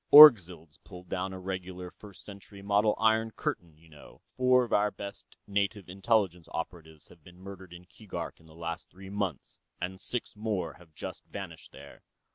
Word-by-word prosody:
"Orgzild's 90 Hz, -, +9 dB
pulled 90 Hz, -2 st, -12 dB
down 95 Hz, +1 st, -2 dB
a 95 Hz, -, -6 dB
regular 90 Hz, -1 st, -5 dB
First 100 Hz, -2 st, -14 dB
Century 100 Hz, 0 st, -11 dB
model 105 Hz, +1 st, +3 dB
iron 110 Hz, 0 st, +3 dB
curtain. 85 Hz, -7 st, -4 dB
You 80 Hz, +1 st, -21 dB
know, 75 Hz, -2 st, -15 dB
four 125 Hz, 0 st, +5 dB
of 120 Hz, -, -4 dB
our 105 Hz, 0 st, +4 dB
best 100 Hz, -1 st, -9 dB
native 100 Hz, -1 st, -1 dB
Intelligence 95 Hz, -2 st, +1 dB
operatives 80 Hz, -2 st, -6 dB
have 85 Hz, -, -18 dB
been 90 Hz, +2 st, -15 dB
murdered 95 Hz, -1 st, -10 dB
in 90 Hz, 0 st, -11 dB
Keegark 90 Hz, -4 st, -7 dB
in 80 Hz, -, -19 dB
the 80 Hz, -, -16 dB
last 85 Hz, 0 st, -5 dB
three 95 Hz, +1 st, -11 dB
months, 100 Hz, -7 st, -3 dB, 0.2 s
and 95 Hz, +1 st, -4 dB
six 120 Hz, -3 st, -3 dB
more 105 Hz, -7 st, -2 dB
have 80 Hz, -3 st, -19 dB
just -, -, -7 dB
vanished -, -, -8 dB
there." -, -, -13 dB
95 Hz, 175 wpm, -30 LUFS, 85-105 Hz, 0.2 s, Orgzild's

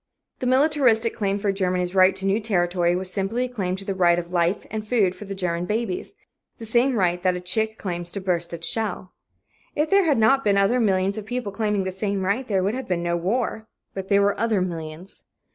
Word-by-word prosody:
The 255 Hz, -, -2 dB
militaristic 255 Hz, -4 st, +3 dB
claim 200 Hz, -2 st, 0 dB
for 200 Hz, 0 st, 0 dB
Germany's 180 Hz, -2 st, -1 dB
right 190 Hz, 0 st, +5 dB
to 190 Hz, 0 st, -4 dB
new 195 Hz, +2 st, +2 dB
territory 175 Hz, -4 st, +1 dB
was 185 Hz, 0 st, -3 dB
simply 215 Hz, +6 st, -1 dB
a -, -, -3 dB
claim 195 Hz, -7 st, -3 dB
to 195 Hz, +1 st, -7 dB
the 195 Hz, -, -2 dB
right 175 Hz, -2 st, +3 dB
of 175 Hz, 0 st, -5 dB
life 175 Hz, +3 st, +1 dB
and 215 Hz, -1 st, -4 dB
food 210 Hz, -6 st, +2 dB
for 210 Hz, -, -10 dB
the 195 Hz, 0 st, -6 dB
German 175 Hz, -2 st, -2 dB
babies 220 Hz, -, -3 dB, 0.4 s
the 225 Hz, -, -8 dB
same 240 Hz, +4 st, +2 dB
right 180 Hz, -2 st, +1 dB
that 185 Hz, 0 st, +1 dB
a -, -, -3 dB
chick 220 Hz, +5 st, -1 dB
claims 175 Hz, -3 st, -4 dB
to 200 Hz, -, -3 dB
burst 175 Hz, -3 st, -1 dB
its 170 Hz, -1 st, -5 dB
shell. 205 Hz, -4 st, -3 dB, 0.6 s
If 305 Hz, +1 st, 0 dB
there 395 Hz, -1 st, +5 dB
had 295 Hz, -5 st, +3 dB
not 270 Hz, +5 st, +4 dB
been 200 Hz, -1 st, +3 dB
other 200 Hz, +6 st, +3 dB
millions 195 Hz, -2 st, +1 dB
of 215 Hz, -, -10 dB
people 245 Hz, -3 st, -3 dB
claiming 210 Hz, -1 st, -1 dB
the 185 Hz, -, -3 dB
same 195 Hz, 0 st, -2 dB
right, 210 Hz, +7 st, -1 dB
there 195 Hz, -3 st, +1 dB
would 200 Hz, +3 st, 0 dB
have 260 Hz, 0 st, -5 dB
been 175 Hz, -2 st, -1 dB
no 170 Hz, 0 st, 0 dB
war. 220 Hz, +5 st, -2 dB, 0.3 s
But 190 Hz, -1 st, -5 dB
there 200 Hz, 0 st, +4 dB
were 200 Hz, 0 st, +1 dB
other 225 Hz, -2 st, +1 dB
millions. 170 Hz, 0 st, -6 dB
195 Hz, 230 wpm, -23 LUFS, 180-225 Hz, 0.6 s, right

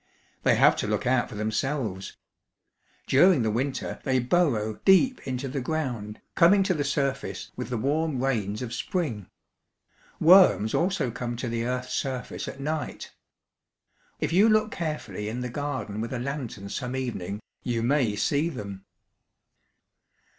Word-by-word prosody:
They -, -, +4 dB
have -, -, +5 dB
to -, -, -2 dB
look -, -, -1 dB
out 125 Hz, 0 st, +2 dB
for 115 Hz, -, -9 dB
themselves. 110 Hz, -1 st, -2 dB, 0.9 s
During 155 Hz, -1 st, +5 dB
the 110 Hz, -, +1 dB
winter 130 Hz, +4 st, -2 dB
they 130 Hz, -2 st, +1 dB
burrow 120 Hz, -6 st, +1 dB
deep 225 Hz, +7 st, +5 dB
into 130 Hz, +1 st, -3 dB
the 135 Hz, +1 st, -3 dB
ground, 125 Hz, -8 st, -3 dB
coming 195 Hz, +3 st, +5 dB
to 190 Hz, -, +1 dB
the 150 Hz, -4 st, -1 dB
surface 140 Hz, -1 st, -2 dB
with -, -, -5 dB
the 125 Hz, -, -2 dB
warm 145 Hz, +3 st, 0 dB
rains 110 Hz, -4 st, -1 dB
of 120 Hz, -1 st, -5 dB
spring. 125 Hz, -, -3 dB, 0.9 s
Worms 160 Hz, -, +6 dB
also 180 Hz, -8 st, +1 dB
come 120 Hz, 0 st, -4 dB
to 125 Hz, +1 st, -4 dB
the 115 Hz, 0 st, -2 dB
earth's 125 Hz, 0 st, -3 dB
surface 130 Hz, -2 st, -3 dB
at 135 Hz, -, -7 dB
night. 150 Hz, +2 st, -4 dB, 1.1 s
If -, -, -1 dB
you 205 Hz, +5 st, +6 dB
look 215 Hz, 0 st, +3 dB
carefully 150 Hz, -, -4 dB
in 120 Hz, +3 st, -4 dB
the 125 Hz, -, -3 dB
garden 120 Hz, -6 st, -4 dB
with 115 Hz, +3 st, -4 dB
a -, -, -1 dB
lantern 120 Hz, -6 st, -5 dB
some 125 Hz, +4 st, -4 dB
evening, 105 Hz, -7 st, -3 dB, 0.2 s
you 115 Hz, -2 st, -1 dB
may 125 Hz, -4 st, +2 dB
see 145 Hz, +9 st, +1 dB
them." 100 Hz, -, -7 dB
130 Hz, 150 wpm, -26 LUFS, 115-150 Hz, 1.1 s, Worms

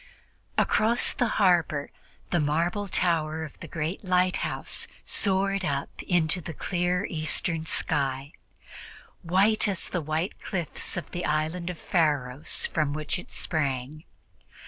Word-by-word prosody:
Across 230 Hz, +3 st, +3 dB
the 245 Hz, -, +1 dB
harbor 170 Hz, -7 st, +3 dB, 0.4 s
the 175 Hz, -, +3 dB
marble 170 Hz, +7 st, +1 dB
tower 160 Hz, -4 st, +1 dB
of 155 Hz, -, -9 dB
the 170 Hz, -, -7 dB
great 160 Hz, +5 st, -3 dB
lighthouse 185 Hz, -1 st, +1 dB, 0.2 s
soared 195 Hz, 0 st, +2 dB
up 140 Hz, -5 st, -2 dB
into 175 Hz, 0 st, +1 dB
the 160 Hz, -1 st, -7 dB
clear 180 Hz, +3 st, 0 dB
Eastern 160 Hz, 0 st, -1 dB
sky, 135 Hz, -1 st, +1 dB, 0.9 s
white 195 Hz, +6 st, +3 dB
as 195 Hz, -3 st, +1 dB
the 175 Hz, -, -1 dB
white 155 Hz, +5 st, -2 dB
cliffs 180 Hz, -2 st, -3 dB
of 175 Hz, -, -5 dB
the 175 Hz, -, -3 dB
Island 155 Hz, +4 st, 0 dB
of 180 Hz, -, -4 dB
Pharos 145 Hz, -6 st, 0 dB
from 150 Hz, -3 st, 0 dB
which 155 Hz, +3 st, -2 dB
it -, -, -12 dB
sprang. 145 Hz, -1 st, -2 dB
165 Hz, 125 wpm, -27 LUFS, 155-180 Hz, 0.9 s, Across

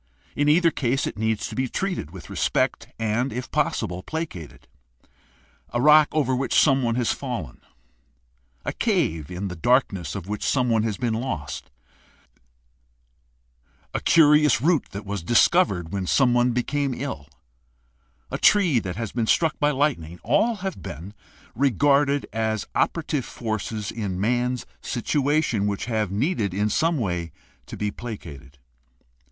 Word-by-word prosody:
In 145 Hz, 0 st, +2 dB
either 165 Hz, +2 st, +4 dB
case 135 Hz, -1 st, 0 dB
it -, -, -4 dB
needs 110 Hz, 0 st, -1 dB
to -, -, -8 dB
be 130 Hz, 0 st, -1 dB
treated 180 Hz, -, -3 dB
with 90 Hz, +1 st, -11 dB
respect -, -, 0 dB
and, 115 Hz, +4 st, 0 dB
if 125 Hz, -, -5 dB
possible, 90 Hz, +1 st, -1 dB
placated. 120 Hz, -, -6 dB, 1.1 s
A 120 Hz, -, +1 dB
rock 150 Hz, +2 st, +7 dB
over 140 Hz, -4 st, +1 dB
which 130 Hz, +1 st, +2 dB
someone 135 Hz, -5 st, +3 dB
has 120 Hz, -2 st, +1 dB
fallen, -, -, -6 dB, 1.0 s
a -, -, -2 dB
cave 135 Hz, -, 0 dB
in 90 Hz, +2 st, -4 dB
the 90 Hz, -, -6 dB
darkness 100 Hz, -2 st, +1 dB
of 95 Hz, -2 st, -6 dB
which 105 Hz, 0 st, -4 dB
someone 125 Hz, -4 st, +2 dB
has 110 Hz, -2 st, -2 dB
been 120 Hz, -3 st, -1 dB
lost, 110 Hz, -, -4 dB, 2.2 s
a -, -, 0 dB
curious 150 Hz, -4 st, +5 dB
root 160 Hz, +4 st, +2 dB
that 100 Hz, +1 st, -7 dB
was 100 Hz, -2 st, -4 dB
discovered 105 Hz, -, +3 dB
when 95 Hz, -2 st, -2 dB
someone 125 Hz, 0 st, +3 dB
became 135 Hz, +2 st, -1 dB
ill, 125 Hz, -, -5 dB, 1.0 s
a -, -, -3 dB
tree 180 Hz, -, +4 dB
that 95 Hz, -5 st, -5 dB
has 115 Hz, -1 st, -4 dB
been 115 Hz, -2 st, -1 dB
struck 165 Hz, +5 st, +2 dB
by 145 Hz, -, +3 dB
lightning 130 Hz, -, -1 dB
— -, -, -37 dB
all 220 Hz, -, +2 dB
have 190 Hz, -, -4 dB
been 85 Hz, +8 st, -8 dB, 0.4 s
regarded 140 Hz, +3 st, +2 dB
as 110 Hz, -1 st, -1 dB
operative 155 Hz, -4 st, 0 dB
forces 110 Hz, -3 st, -4 dB
in 100 Hz, -5 st, -4 dB
man's 125 Hz, +4 st, 0 dB, 0.2 s
situation 135 Hz, -3 st, 0 dB
which 100 Hz, -1 st, -2 dB
have 110 Hz, -4 st, -1 dB
needed 105 Hz, -, -1 dB
in 105 Hz, +2 st, +1 dB
some 165 Hz, +7 st, +2 dB
way 90 Hz, -8 st, -2 dB, 0.4 s
to -, -, -8 dB
be 105 Hz, 0 st, -1 dB
placated. 75 Hz, -, -9 dB
120 Hz, 145 wpm, -24 LUFS, 100-145 Hz, 2.2 s, rock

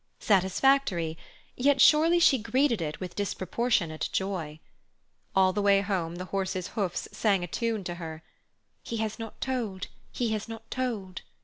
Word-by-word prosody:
Satisfactory; 190 Hz, -3 st, +2 dB, 0.4 s
yet 275 Hz, +2 st, +3 dB
surely 320 Hz, +5 st, +6 dB
she 295 Hz, -6 st, +5 dB
greeted 235 Hz, -1 st, +1 dB
it 155 Hz, -2 st, -4 dB
with 180 Hz, -2 st, -6 dB
disproportionate 190 Hz, -4 st, -1 dB
joy. 175 Hz, -6 st, -3 dB, 0.8 s
All 190 Hz, -1 st, +4 dB
the 205 Hz, -, 0 dB
way 200 Hz, -1 st, +4 dB
home 185 Hz, -5 st, -2 dB
the 180 Hz, +1 st, -5 dB
horses' 190 Hz, -2 st, -2 dB
hoofs 195 Hz, -5 st, -2 dB
sang 200 Hz, -5 st, +1 dB
a -, -, -3 dB
tune 225 Hz, +2 st, -2 dB
to 175 Hz, -, -4 dB
her: 160 Hz, -1 st, -7 dB, 0.6 s
"He 230 Hz, -, -5 dB
has 220 Hz, 0 st, -3 dB
not 225 Hz, -1 st, -8 dB
told, 225 Hz, -8 st, -2 dB, 0.3 s
he 240 Hz, -2 st, -1 dB
has 215 Hz, -2 st, -2 dB
not 225 Hz, 0 st, -9 dB
told." 215 Hz, -8 st, -3 dB
200 Hz, 150 wpm, -28 LUFS, 185-235 Hz, 0.8 s, surely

